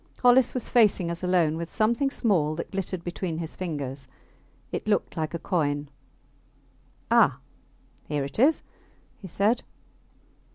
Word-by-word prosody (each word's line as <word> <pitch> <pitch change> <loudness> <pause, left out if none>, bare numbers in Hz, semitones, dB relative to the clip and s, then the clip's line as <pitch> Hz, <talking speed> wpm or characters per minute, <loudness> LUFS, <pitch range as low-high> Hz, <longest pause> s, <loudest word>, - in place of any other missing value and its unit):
Hollis 245 +1 +5
was 250 - -1
facing 205 -7 +3
us 170 - -6
alone 175 -4 +2
with 170 0 -5
something 235 +6 +1
small 175 - +1
that 170 - -6
glittered 190 -2 -4
between 175 -1 -4
his 160 -1 -4
fingers. 145 -6 -5 0.6
It - - -4
looked - - 0
like 160 0 -3
a - - 0
coin. 145 -5 -1 1.2
Ah! - - +5 0.7
here 145 -2 -1
it 140 +8 -6
is, 295 +6 +4 0.6
he 190 - -8
said. 205 +7 +1
175 Hz, 135 wpm, -26 LUFS, 155-215 Hz, 1.2 s, Hollis